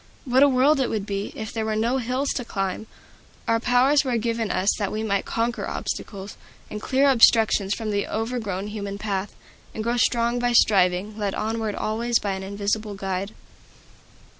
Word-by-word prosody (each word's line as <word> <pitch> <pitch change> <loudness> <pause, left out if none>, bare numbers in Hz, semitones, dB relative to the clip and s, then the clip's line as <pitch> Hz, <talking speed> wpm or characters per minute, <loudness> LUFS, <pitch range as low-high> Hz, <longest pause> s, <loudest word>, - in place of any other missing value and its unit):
What 255 0 +3
a 285 - +7
world 275 +3 +3
it 260 - +1
would 210 -3 -2
be, 200 0 -3
if 220 0 -6
there 225 - -2
were 220 0 -1
no 235 +5 +1
hills 255 +3 -1
to 250 - -3
climb! 195 -1 -3 0.6
Our 230 0 +2
powers 250 +5 +3
were 255 -3 0
given 230 -1 -1
us 190 +3 +2
that 200 -2 -1
we 215 +1 -3
might 200 -3 0
conquer 235 +1 -2
obstacles, 195 -1 -5 0.3
and 210 - -5
clear 270 +4 +2
obstructions 225 -5 +4
from 220 -2 -4
the 200 -1 -1
overgrown 220 -4 -3
human 200 -2 -5
path, 200 -1 -3 0.4
and 220 - -3
grow 235 +2 0
strong 235 0 +2
by 245 0 +1
striving, 200 -1 +3
led 200 -2 -1
onward 220 -1 -2
always 230 +2 0
by 200 - -2
an 190 0 -4
Invisible 200 +2 -2
Guide. 195 +1 -4
220 Hz, 180 wpm, -24 LUFS, 200-240 Hz, 0.6 s, a